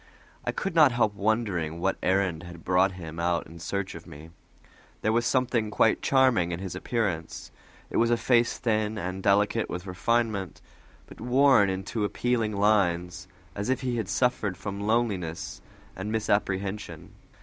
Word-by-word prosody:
I - - -1
could 195 - -3
not 155 -5 +6
help 110 -3 +2
wondering 100 -6 -1
what 95 +2 0
errand 95 -3 +1
had 85 -1 -11
brought 95 +1 +3
him 85 -3 -8
out 85 0 0
in 85 +1 -12
search 95 +3 -3
of - - -11
me. 80 +3 -12 0.7
There 110 - +2
was 120 +1 +2
something 125 -4 +1
quite 110 +1 +2
charming 130 -10 +3
in 85 - -2
his 95 -2 -5
appearance: 95 -9 -3 0.4
it - - -1
was 115 - +3
a 120 - +3
face 120 0 +2
thin 110 -2 0
and 95 -1 -4
delicate 105 +3 +2
with 90 +1 -5
refinement, 100 0 -1 0.5
but - - -14
worn 125 -3 +4
into 95 +4 -3
appealing 115 +1 0
lines, 90 -3 +1 0.3
as 100 +4 -4
if 130 0 +1
he 125 -2 -1
had 110 -5 -3
suffered 110 -7 0
from 100 -1 -5
loneliness 100 -7 -1 0.3
and 100 +3 -5
misapprehension. 100 -2 -2
100 Hz, 160 wpm, -27 LUFS, 90-115 Hz, 0.7 s, not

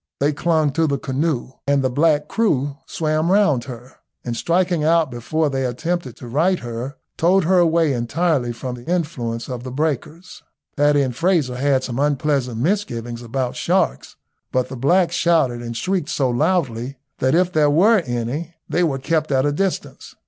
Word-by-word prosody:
They 145 +2 +2
clung 155 -1 +1
to 165 +3 +1
the 140 -1 0
canoe, 135 0 -2 0.2
and 140 -1 +2
the 130 - +2
black 150 +2 +2
crew 145 - 0
swam 155 +1 0
round 190 - +3
her, 125 0 -10 0.3
and 120 -1 -3
striking 175 +4 +1
out 160 -2 +3
before 150 +7 -1
they 135 -2 -1
attempted 130 +2 -2
to 125 - -10
right 165 +10 +2
her, 120 +2 -6 0.2
towed 185 +3 +3
her 180 +2 +3
away 165 -3 +3
entirely 125 +2 0
from 125 +2 -5
the 120 +4 -9
influence 125 -10 -2
of 125 -2 -5
the 130 - -6
breakers. 155 +5 -3 0.3
Paddy 145 -1 +3
and 125 -3 -3
Frazer 160 -4 +1
had 135 0 +1
some 125 -1 -4
unpleasant 140 -4 0
misgivings 120 - -2
about 125 +1 -3
sharks, 60 +2 0 0.4
but 130 -1 0
the 135 - -6
blacks 170 +7 +2
shouted 160 -9 +2
and 115 -1 -5
shrieked 185 +4 -1
so 130 -3 0
loudly, 130 -3 0 0.2
that 130 +4 +2
if 180 +1 +2
there 150 -2 +4
were 200 +9 +5
any 140 +4 -4
they 180 - +1
were 145 -5 0
kept 155 +3 -1
at 135 0 +2
a 145 - +2
distance. 190 +5 -3
145 Hz, 175 wpm, -21 LUFS, 125-165 Hz, 0.4 s, were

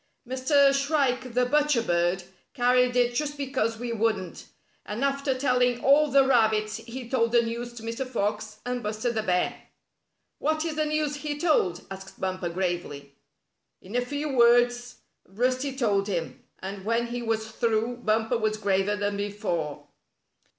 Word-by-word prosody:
''Mr. 275 +2 +3
Shrike 275 -4 0
the 250 0 +3
Butcher 290 -2 +2
Bird 175 -1 +1 0.3
carried 250 -1 +3
it 245 -1 +3
just 295 +3 -2
because 260 -5 -1
we 240 0 -4
wouldn't. 215 -5 -2 0.4
And 215 +5 -4
after 275 -1 0
telling 250 -2 +1
all 290 +3 +5
the 275 0 +5
rabbits 220 -4 +2
he 235 +2 -8
told 230 -2 +1
the 235 0 +4
news 235 +1 -4
to 235 -2 -10
Mr. 230 +3 -3
Fox 215 -2 -3
and 245 0 -2
Buster 215 +3 -2
the 220 -2 -1
Bear." 180 -4 0 0.8
"What 310 +2 0
is 325 - -2
the 310 0 +1
news 300 -1 -1
he 290 0 -4
told?" 290 - +1
asked 195 0 -9
Bumper, 185 -2 -2
gravely. 170 -6 -3 0.7
In 195 +5 -10
a 245 - +3
few 285 +2 -3
words 245 0 +4 0.3
Rusty 255 +7 -1
told 205 -6 +1
him, 170 -5 -4
and 195 0 -7
when 230 +3 +1
he 240 +1 -4
was 220 -1 -2
through 230 +1 0
Bumper 225 0 0
was 215 -1 0
graver 200 0 +1
than 205 0 -2
before. 185 -7 -3
235 Hz, 155 wpm, -26 LUFS, 210-260 Hz, 0.8 s, all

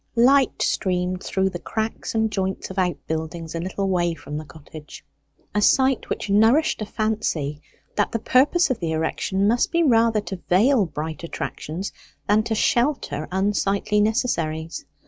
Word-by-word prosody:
Light 260 +3 +4
streamed 180 -1 0
through 190 0 0
the 175 - -5
cracks 220 +3 -4
and 220 -1 +1
joints 190 -1 -3
of 190 - -3
outbuildings 165 -2 -3
a 165 - -3
little 190 +3 -2
way 175 -3 +1
from 145 -1 -8
the 155 +1 -5
cottage, 150 0 -12 0.5
a 210 - +1
sight 265 +4 +3
which - - -3
nourished 225 +9 +3
a 215 - -3
fancy 170 -10 -2 0.4
that 205 - +1
the - - 0
purpose 265 +8 +3
of 255 - -1
the 165 -2 -2
erection 190 +5 0
must 235 +3 +2
be 335 0 +2
rather 230 -5 +3
to 190 -3 -7
veil 210 +3 +4
bright 155 +1 -5
attractions 170 +2 -5 0.4
than 210 +1 +4
to 220 0 -2
shelter 235 - 0
unsightly 200 +2 +1
necessaries. 165 -8 -1
195 Hz, 155 wpm, -23 LUFS, 165-225 Hz, 0.5 s, Light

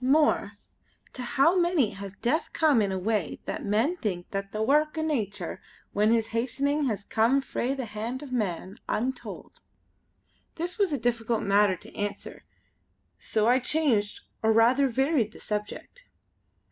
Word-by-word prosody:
more, 295 +4 +3 0.6
to 255 - -5
how 275 +8 +3
many 345 - +2
has 195 0 -8
Death 290 +11 0
come 300 -8 +4
in 200 -2 0
a 190 - -1
way 200 -2 -1
that - - -4
men 225 - +1
think 180 - -3
the 195 0 -3
wark 300 +7 +2
o' 315 - 0
nature 205 - -2 0.3
when 210 +1 +3
his 225 -1 +2
hastening 280 +5 0
has 210 -4 -3
come 230 +5 +3
frae 270 -1 -2
the 265 -2 -4
hand 230 +5 -5
of 275 - -9
man, 195 -4 -2
untold." 250 +3 -4 0.9
This 350 +5 -4
was 395 -4 +3
a 290 - +1
difficult 230 -1 0
matter 200 -1 +4
to - - -13
answer 205 0 -5 0.8
so 215 -1 0
I 250 +2 +5
changed 250 -7 0 0.2
or 220 - +3
rather 240 +5 +4
varied 260 -3 +1
the - - -13
subject. 210 - -5
235 Hz, 155 wpm, -27 LUFS, 210-280 Hz, 0.9 s, I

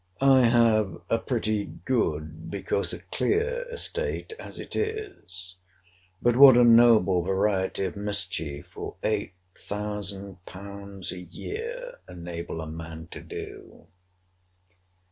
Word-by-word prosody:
I 135 -2 +6
have 115 -5 +3
a - - +3
pretty 105 -1 -1
good, 80 -12 -2
because 100 +2 0
a - - -6
clear, 475 +4 0
estate, 470 -1 -2
as - - -8
it - - -6
is. 380 - -4 0.7
But 120 -1 +4
what 135 -2 +10
a 125 - +7
noble 115 -6 +6
variety 95 +1 0
of 90 - -4
mischief 90 -8 -2
will - - -6
8000£. 100 0 -5
a 90 - -6
year, 470 - -6
enable 85 -1 -6
a 80 - -6
man 80 +1 -8
to - - -7
do? - - -9
100 Hz, 110 wpm, -27 LUFS, 90-120 Hz, 0.7 s, what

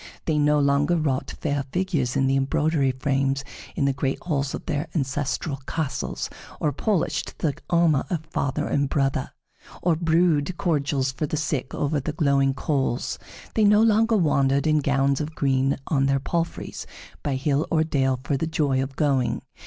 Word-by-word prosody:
They 155 -2 +1
no 150 0 +3
longer 145 +3 +2
wrought 140 -4 -1
fair 145 -2 0
figures 170 -9 0
in 135 - +2
the 135 0 +2
embroidery 140 +1 +1
frames 135 +1 0 0.3
in 140 - +1
the 140 - +2
great 135 0 -1
halls 140 -5 -1
of - - -8
their 150 -1 -2
ancestral 140 0 -1
castles, 140 - -3 0.3
or 150 - +1
polished 185 +5 -1
the 150 -4 0 0.2
armor 170 -5 +3
of 160 -3 -2
father 140 -3 -2
and 140 -1 0
brother, 135 -2 0 0.5
or 170 -2 +2
brewed 165 0 +2
cordials 140 -6 0
for 150 +3 -3
the 155 - -2
sick 145 -4 -2
over 145 +1 0
the 145 +3 -4
glowing 140 -3 +2
coals. 135 -4 -1 0.3
They 220 - +2
no 210 +1 +6
longer 225 0 +4
wandered 140 -5 +2
in 155 -1 +3
gowns 140 -1 +1
of 155 +1 -5
green 135 -1 +1
on 135 -3 +1
their 135 0 +2
palfreys 165 +4 -3 0.3
by 140 -2 -1
hill 140 +3 0
or 160 -1 +3
dale 135 -4 0
for 140 - 0
the 160 - -1
joy 145 -5 +1
of 135 0 -4
going. 135 -5 +1
145 Hz, 170 wpm, -24 LUFS, 135-160 Hz, 0.5 s, no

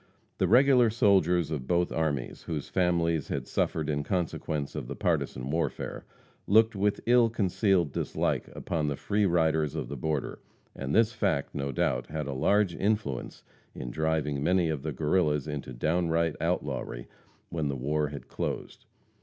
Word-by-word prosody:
The - - +3
regular 125 0 +6
soldiers 95 - +3
of 70 -4 -3
both 90 0 +1
armies, 75 -6 -2
whose 75 -4 -5
families 85 -4 +1
had - - -3
suffered 80 -2 -1
in 75 -1 0
consequence 80 -4 -2
of 75 -5 -5
the - - -5
partisan 65 +2 -1
warfare, 80 +2 -2 0.4
looked 110 +2 +5
with 100 +1 0
ill 120 -1 +5
concealed 95 - +1
dislike - - -1
upon 80 -3 -2
the 70 - -1
free 105 +6 +1
riders 80 -4 +1
of - - -4
the 70 - -4
border, 75 +1 -2 0.4
and 70 +1 -3
this 115 0 +4
fact, 100 -11 0
no 70 0 -2
doubt, - - 0
had 75 -1 -4
a 70 - -3
large 100 +7 +2
influence 100 - -2 0.3
in 60 -1 -5
driving 80 -1 0
many 90 +2 +2
of 75 -4 -2
the 75 +2 -3
Guerrillas 75 0 +1
into 75 -3 -5
downright 80 +4 0
outlawry 85 -7 -2 0.4
when 80 -3 -2
the 70 - -2
war 75 +4 0
had 70 -3 -8
closed. - - -5
80 Hz, 160 wpm, -28 LUFS, 70-95 Hz, 0.4 s, regular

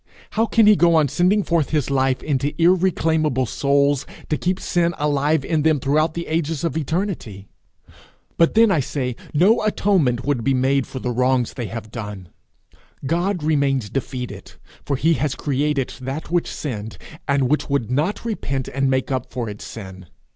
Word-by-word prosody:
How 225 +1 +1
can 225 0 +4
he 210 0 +7
go 170 -3 +4
on 155 -3 +3
sending 190 +8 +2
forth 165 -6 0
his 150 -3 0
life 135 -1 +1
into 145 0 -1
irreclaimable 165 -6 +2
souls, 140 +2 +1 0.2
to 155 - +2
keep 185 +1 -1
sin 170 -1 0
alive 145 0 +1
in 160 -2 +1
them 155 -1 +3
throughout 155 +4 +1
the 170 0 -3
ages 160 -1 -2
of 165 -4 -1
eternity? 160 - -3 0.9
But 165 +4 +3
then, 225 -1 +6
I 165 - +3
say, 125 -2 -2 0.2
no 185 +9 +4
atonement 185 - +1
would 140 -5 0
be 135 +3 +2
made 135 +1 +1
for - - -8
the 125 -1 -2
wrongs 125 0 +1
they 120 -4 -4
have 110 -1 -7
done; 105 -6 -7 0.8
God 175 +3 0
remains 140 -7 +1
defeated, 130 -2 -5 0.3
for 140 - -1
he 160 +5 +2
has 145 -3 0
created 145 -1 -1
that 135 +6 -5
which 175 -1 +1
sinned, 110 -7 -5 0.3
and 140 -2 +2
which 150 +3 0
would 140 -5 -1
not 155 - -1
repent 140 - -3
and 135 0 0
make 130 +1 0
up 130 -1 -2
for 120 -1 -3
its 105 0 -8
sin. 95 -4 -9
145 Hz, 175 wpm, -21 LUFS, 130-165 Hz, 0.9 s, he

